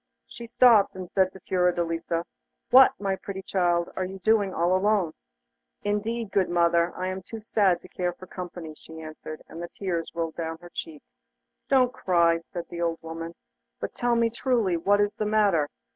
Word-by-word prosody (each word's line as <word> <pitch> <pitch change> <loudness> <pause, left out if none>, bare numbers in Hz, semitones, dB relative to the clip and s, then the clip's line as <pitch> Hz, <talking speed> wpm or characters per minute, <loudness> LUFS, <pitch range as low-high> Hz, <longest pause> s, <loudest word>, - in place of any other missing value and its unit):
She 235 - -10
stopped, 230 -5 +5
and 185 -2 -7
said 190 -1 +2
to 190 - -13
Fiordelisa: 170 -2 0 0.5
'What, 260 +1 +7
my 195 -1 0
pretty 195 0 -7
child, 175 -3 +1
are 185 - -1
you 190 +1 -5 0.3
all 175 +1 +2
alone?' 190 -4 +2 0.7
'Indeed, 215 +1 -2
good 190 -2 +2
mother, 170 0 +3
I 185 - -3
am 185 0 -4
too 220 +4 -9
sad 195 -5 +2
to - - -11
care 180 -1 -2
for 180 +1 -12
company,' 175 -3 -7
she 160 +1 -12
answered; 155 0 -8
and 165 - -9
the 175 - -6
tears 175 -4 -2
ran 165 -1 -1
down 165 0 -4
her 175 0 -12
cheeks. 155 -3 -7 0.6
'Don't 255 -2 +4
cry,' 170 -2 +2
said 170 +1 -8
the 170 0 -6
old 165 -1 0
woman, 165 +1 -6 0.4
'but - - -4
tell 240 -1 +1
me 230 -1 +2
truly 230 -6 +1
what 200 +5 +2
is 205 0 +2
the 215 - -3
matter. 200 -9 +3
180 Hz, 180 wpm, -26 LUFS, 170-205 Hz, 0.7 s, What